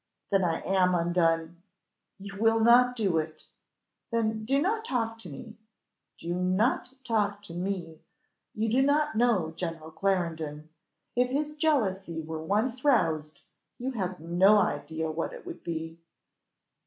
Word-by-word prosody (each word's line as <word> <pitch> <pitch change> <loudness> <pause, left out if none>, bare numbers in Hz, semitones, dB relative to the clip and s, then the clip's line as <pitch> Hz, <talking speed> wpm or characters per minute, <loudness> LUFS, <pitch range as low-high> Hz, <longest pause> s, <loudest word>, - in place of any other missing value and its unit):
Then 195 -1 +3
I 165 -2 0
am 185 -1 +2
undone! 170 -1 +1 0.6
You 200 0 -9
will 225 +1 +4
not 245 +2 +6
do 195 -8 +1
it! 155 0 -6 0.6
Then 220 -2 -1
do 275 +4 +2
not 435 +8 0
talk 225 - -2
to 185 - -8
me 220 - -10 0.6
do 170 +1 -4
not 185 +8 +1
talk 205 -4 0
to 175 - -9
me 175 -3 -4 0.6
you 220 +1 0
do 245 +4 +3
not 285 -2 +2
know 215 -9 +2
General 165 -2 -5
Clarendon. 160 -4 -2 0.5
If 250 +1 +2
his 295 +3 -1
jealousy 205 - 0
were 160 0 -5
once 220 +9 -1
roused, 160 - +1 0.4
you 255 +2 -3
have 185 -6 -3
no 175 +6 +4
idea 160 -3 -1
what 165 +1 -3
it - - -10
would 350 -2 -8
be." 165 0 -5
195 Hz, 140 wpm, -28 LUFS, 165-230 Hz, 0.6 s, not